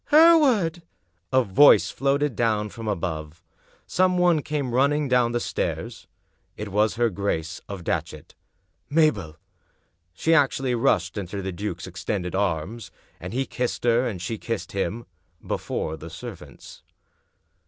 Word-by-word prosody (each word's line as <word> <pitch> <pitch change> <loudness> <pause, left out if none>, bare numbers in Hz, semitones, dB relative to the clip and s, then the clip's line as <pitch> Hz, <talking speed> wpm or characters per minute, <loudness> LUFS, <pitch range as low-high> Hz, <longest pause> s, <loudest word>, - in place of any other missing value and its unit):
" - - -26
"HerewardI" 285 - +5 0.5
A 130 0 +4
voice 100 - +6
floated 140 -1 0
downward 105 -3 0
from 115 -2 -7
above. 85 -4 -4 0.4
Some 185 0 +2
one 175 -3 +3
came 140 -4 -3
running 140 +3 +2
down 125 -2 +3
the 120 - 0
stairs. - - -4 0.5
It 105 0 -5
was 105 +2 +1
her 120 -1 +1
Grace 90 -4 -3
of 100 -3 -6
Datchet. - - -4 0.6
"Mabel!" 140 - +2 0.8
She 160 - +1
actually 135 -4 +2
rushed 100 -5 +1
into 100 +1 -5
the 95 - -3
duke's 90 -1 -5
extended 90 0 -4
arms. 100 +3 -2 0.3
And 90 - -7
he 130 +4 -1
kissed 125 -2 -3
her, 120 +1 +3
and 100 -6 -4
she 105 +5 -4
kissed 115 - -4
him 110 +4 -3 0.2
— 85 0 -39
^before 80 0 -3
the 85 - -8
servants. 85 - -10
115 Hz, 145 wpm, -24 LUFS, 95-135 Hz, 0.8 s, voice